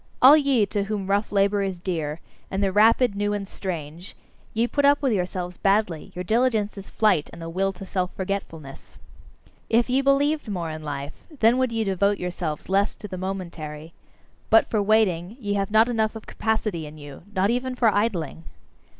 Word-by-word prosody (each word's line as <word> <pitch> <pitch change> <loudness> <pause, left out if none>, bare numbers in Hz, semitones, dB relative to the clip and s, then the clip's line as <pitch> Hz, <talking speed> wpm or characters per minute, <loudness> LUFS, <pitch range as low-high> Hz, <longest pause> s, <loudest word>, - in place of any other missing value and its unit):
All 270 +4 +9
ye 275 -7 +3
to 200 0 -2
whom 205 -2 -3
rough 200 +2 0
labour 200 0 +2
is 190 -2 -3
dear, 160 -4 -3 0.3
and 195 +1 -1
the 195 - +2
rapid, 225 +3 +4
new, 205 +1 -1
and 200 -1 -3
strange 170 -2 -6 0.4
ye 225 +2 +1
put 285 +4 -1
up 285 +1 +5
with 260 -4 +2
yourselves 180 -2 -3
badly; 195 -5 +1
your 180 - -4
diligence 220 0 +1
is 195 -1 -9
flight, 205 -9 +2
and 170 - -11
the 165 - -6
will 195 +3 0
to 195 +1 -9
self 185 -1 -2
forgetfulness. 175 -7 -6 0.7
If 235 +2 +2
ye 265 +2 +3
believed 280 +2 +2
more 175 -5 -3
in 155 0 -6
life, 145 -1 -5 0.3
then 230 +3 +4
would 255 -2 +1
ye 225 -1 0
devote 200 0 +1
yourselves 175 -4 -4
less 200 +2 +1
to 210 - -9
the 190 - -6
momentary. 170 -4 -6 0.6
But 225 - +5
for 215 - +2
waiting, 200 -2 +1
ye 205 -4 -2
have 195 -1 -1
not 220 +2 +5
enough 220 -2 0
of 220 - -8
capacity 215 -7 -2
in 150 +1 -11
you 145 -2 -11
nor 190 +1 +3
even 250 +1 -2
for 230 -4 +3
idling! 175 - -1
200 Hz, 190 wpm, -24 LUFS, 180-220 Hz, 0.7 s, All